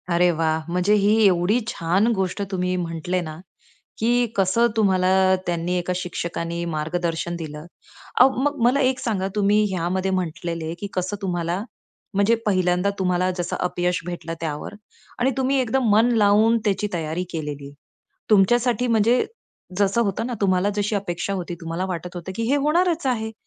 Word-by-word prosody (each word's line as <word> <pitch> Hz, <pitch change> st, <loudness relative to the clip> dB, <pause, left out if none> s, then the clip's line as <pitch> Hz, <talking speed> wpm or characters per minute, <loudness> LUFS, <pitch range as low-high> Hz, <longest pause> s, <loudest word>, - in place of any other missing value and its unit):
अरे 175 Hz, +1 st, +3 dB
वाह! 160 Hz, -1 st, 0 dB
म्हणजे 180 Hz, +4 st, +2 dB
ही 215 Hz, +2 st, +4 dB
एवढी 185 Hz, +4 st, +3 dB
छान 190 Hz, -1 st, +1 dB
गोष्ट 190 Hz, +1 st, -2 dB
तुम्ही 180 Hz, -1 st, -1 dB
म्हटले 175 Hz, +1 st, -2 dB
ना, 155 Hz, -2 st, -7 dB, 0.6 s
की 240 Hz, +2 st, +2 dB
कसं 195 Hz, +5 st, +3 dB
तुम्हाला 190 Hz, -4 st, +3 dB, 0.4 s
त्यांनी 170 Hz, 0 st, -1 dB
एका 180 Hz, +1 st, -1 dB
शिक्षकानी 170 Hz, -1 st, -4 dB
मार्गदर्शन 170 Hz, +1 st, -2 dB
दिलं. 155 Hz, -2 st, -7 dB, 0.6 s
अहो, 260 Hz, -, +8 dB
मग 290 Hz, 0 st, 0 dB
मला 255 Hz, +4 st, +3 dB
एक 260 Hz, 0 st, +1 dB
सांगा, 200 Hz, -6 st, -1 dB
तुम्ही 210 Hz, +1 st, +3 dB
ह्यामध्ये 185 Hz, +2 st, -1 dB
म्हंटले 170 Hz, -2 st, -3 dB
की 200 Hz, -, -4 dB
कसं 185 Hz, +2 st, -2 dB
तुम्हाला 175 Hz, 0 st, -2 dB, 0.5 s
म्हणजे 200 Hz, +4 st, +3 dB
पहिल्यांदा 185 Hz, -1 st, +2 dB
तुम्हाला 180 Hz, -1 st, +1 dB
जसं 175 Hz, -1 st, -2 dB
अपयश 180 Hz, 0 st, 0 dB
भेटलं 175 Hz, -2 st, -5 dB
त्यावर 150 Hz, +3 st, -4 dB, 0.5 s
आणि 255 Hz, +2 st, +2 dB
तुम्ही 265 Hz, +1 st, +1 dB
एकदम 255 Hz, +2 st, 0 dB
मन 220 Hz, +3 st, +5 dB
लावून 215 Hz, +2 st, +4 dB
त्याची 205 Hz, 0 st, +1 dB
तयारी 165 Hz, +1 st, -2 dB
केली. 145 Hz, -3 st, -5 dB, 0.6 s
तुमच्यासाठी 240 Hz, +4 st, +3 dB
म्हणजे 230 Hz, +2 st, +3 dB, 0.5 s
जसं 200 Hz, +3 st, +2 dB
होतं 205 Hz, 0 st, -1 dB
ना, 250 Hz, -, -3 dB
तुम्हाला 190 Hz, 0 st, +2 dB
जशी 210 Hz, +1 st, 0 dB
अपेक्षा 195 Hz, -1 st, -2 dB
होती 175 Hz, -2 st, -4 dB
तुम्हाला 165 Hz, +3 st, -3 dB
वाटत 180 Hz, -1 st, -5 dB
होतं 175 Hz, +2 st, -6 dB
की 230 Hz, -, -2 dB
हे 280 Hz, -, +4 dB
होणारच 325 Hz, +3 st, +1 dB
आहे 220 Hz, -3 st, -1 dB
185 Hz, 155 wpm, -23 LUFS, 175-215 Hz, 0.6 s, अहो